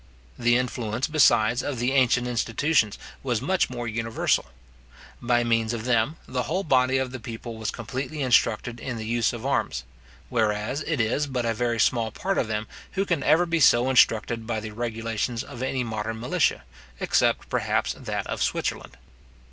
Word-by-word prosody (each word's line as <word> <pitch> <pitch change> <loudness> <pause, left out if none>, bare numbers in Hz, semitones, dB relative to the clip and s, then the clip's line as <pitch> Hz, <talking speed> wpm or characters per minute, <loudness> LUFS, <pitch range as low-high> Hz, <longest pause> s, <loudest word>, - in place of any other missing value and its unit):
The 120 0 +4
influence, 125 -1 -2
besides, 120 -6 +4
of 145 -3 -3
the 120 +2 0
ancient 125 -2 +3
institutions, 120 0 +1 0.2
was 125 -4 0
much 180 +9 +1
more 120 -2 -5
universal. 115 0 0 0.8
By 120 0 +2
means 115 -1 +1
of 115 -1 -4
them, 120 +4 +2
the 125 0 -1
whole 185 +5 0
body 130 -4 +3
of 130 -1 -1
the 130 - -6
people 115 0 -7
was 110 -2 -3
completely 130 +5 -4
instructed 120 -1 +2
in 125 -1 -4
the 110 - -5
use 115 0 +1
of 120 +1 -7
arms; 65 - 0 0.4
whereas 110 +3 0
it 155 -4 0
is 120 +6 +1
but 125 -3 -2
a 115 - +1
very 115 0 -1
small 115 0 +2
part 190 - -2
of - - 0
them 105 0 -2 0.3
who 195 +1 0
can 170 -6 0
ever 165 +6 +4
be 165 -1 0
so 130 -2 +5
instructed 115 -2 +3
by 115 -2 -1
the 110 0 -7
regulations 115 +1 -3
of 120 - -9
any 130 0 -1
modern 110 -1 -4
militia, 125 +3 +1 0.4
except, - - +1
perhaps, - - 0
that - - -4
of - - -4
Switzerland. - - -2
120 Hz, 175 wpm, -25 LUFS, 115-130 Hz, 0.8 s, so